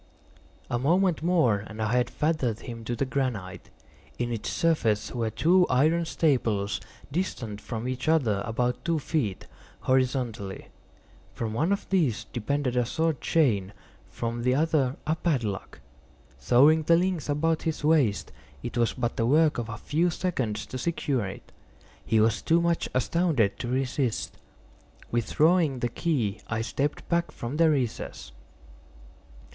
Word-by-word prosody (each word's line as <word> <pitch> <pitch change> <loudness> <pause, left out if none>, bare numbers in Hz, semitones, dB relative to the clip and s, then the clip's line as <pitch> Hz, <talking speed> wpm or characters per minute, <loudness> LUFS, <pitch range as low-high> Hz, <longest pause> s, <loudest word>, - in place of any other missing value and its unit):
A 120 - -1
moment 175 +5 +2
more 155 - +2
and 110 0 -10
I 110 0 0
had 125 0 +2
fettered 140 -8 -1
him 115 -2 -7
to 120 - -2
the 125 - 0
granite. 125 -9 -3 0.5
In 120 0 -2
its 110 - -3
surface 130 -11 +1
were 115 -3 -1
two 175 - +3
iron 155 +6 +3
staples, 115 -11 0 0.3
distant 125 - -3
from 115 +1 -5
each 130 +3 -4
other 120 -11 +2
about 120 +2 -1
two 170 -1 +1
feet, 140 - -2 0.4
horizontally. 125 -6 -1 0.7
From 110 -2 -3
one 155 - +1
of 200 - -1
these 155 - +2
depended 125 +2 -2
a 125 - +3
short 160 +3 -1
chain, 105 - +1 0.4
from 115 0 -4
the 125 +2 +2
other 145 -4 +1
a 155 - +1
padlock. 120 - -2 0.6
Throwing 145 +6 +5
the 165 +2 +4
links 180 -4 -1
about 160 +2 +1
his 160 -2 -3
waist, 150 -9 +2 0.3
it 120 0 -3
was 115 - +2
but 120 - -2
the 115 - +1
work 155 +1 +4
of 115 -1 -4
a 110 - -5
few 165 +9 +1
seconds 130 - -2
to 130 - -6
secure 135 - -1
it. 95 - -10 0.5
He 110 0 +2
was 110 0 +2
too 165 +1 +3
much 170 0 0
astounded 130 - +1
to - - -4
resist. 130 -1 -1 0.8
Withdrawing 150 +5 +2
the 120 0 -1
key 115 - -1
I 110 -1 -2
stepped 140 +5 -2
back 170 0 +1
from 120 +5 -5
the 165 0 +5
recess. 125 - -2
130 Hz, 150 wpm, -27 LUFS, 115-160 Hz, 0.8 s, Throwing